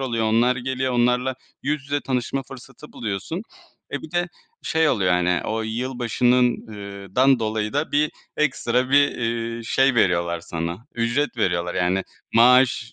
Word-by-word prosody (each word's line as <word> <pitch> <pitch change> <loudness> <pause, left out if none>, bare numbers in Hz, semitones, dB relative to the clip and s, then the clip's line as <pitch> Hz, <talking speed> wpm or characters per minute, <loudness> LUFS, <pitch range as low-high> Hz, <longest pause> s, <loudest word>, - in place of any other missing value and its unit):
oluyor. 115 -4 -1
Onlar 120 +3 +3
geliyor, 130 +1 -2
onlarla 125 +2 +2 0.3
yüz 145 0 -1
yüze 145 +1 -2
tanışma 130 +1 -2
fırsatı 135 +2 -13
buluyorsun. 115 - -4 0.5
E - - -3
bir 155 - -9
de 175 0 0 0.3
şey 160 -1 +2
oluyor, 95 -6 +2
hani, 90 0 +2
o 110 0 -2
yılbaşının, 125 +1 +1
ııı, 100 -2 -9
dan 130 0 +5
dolayı 110 -1 -2
da 145 +2 -1
bir 150 +1 +2 0.3
ekstra 130 -4 0
bir, 145 0 +5
eee, 115 0 -2
şey 135 +3 +2
veriyorlar 85 -5 +2
sana, 85 +7 -5
ücret 120 +4 0
veriyorlar. 90 -5 0
Yani 95 +1 +1 0.3
maaş, 125 0 +5
120 Hz, 150 wpm, -23 LUFS, 110-130 Hz, 0.5 s, dan